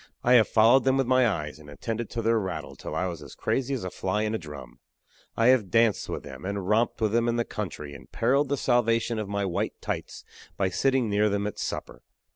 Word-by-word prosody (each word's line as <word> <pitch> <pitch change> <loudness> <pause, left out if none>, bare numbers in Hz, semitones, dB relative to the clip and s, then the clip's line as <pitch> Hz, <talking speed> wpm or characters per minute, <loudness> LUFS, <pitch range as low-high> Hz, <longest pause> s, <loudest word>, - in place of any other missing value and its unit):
I 125 - +4
have 115 -3 +6
followed 115 +4 +5
them 135 0 +3
with 135 - +2
my 130 0 +4
eyes, 80 -7 -3
and 75 -1 -13
attended 115 - -4
to 115 - -4
their 115 0 +3
rattle 95 -3 -5
till - - -7
I 90 - 0
was 85 -4 -5
as - - -11
crazy 135 +1 -1
as 125 - -5
a 90 - -4
fly 105 +3 -1
in 110 0 -1
a 110 - -1
drum. 75 -6 -10 0.6
I 115 +2 +5
have 120 -7 +3
danced 115 -1 +2
with - - -4
them, - - -10
and 100 -1 -3
romped 110 +3 +2
with 110 -2 +2
them 115 +1 +2
in 120 - +1
the 120 0 0
country, 80 -8 -6
and 70 - -13
periled 135 +4 +2
the 140 - 0
salvation 115 -2 +1
of 105 -2 -4
my 100 0 -1
"white 90 - -2
tights" - - -5 0.3
by 95 -1 +1
sitting 130 +6 +1
near 105 +1 +2
them 100 0 -1
at 105 - -4
supper. - - -5
110 Hz, 240 wpm, -27 LUFS, 95-120 Hz, 0.6 s, have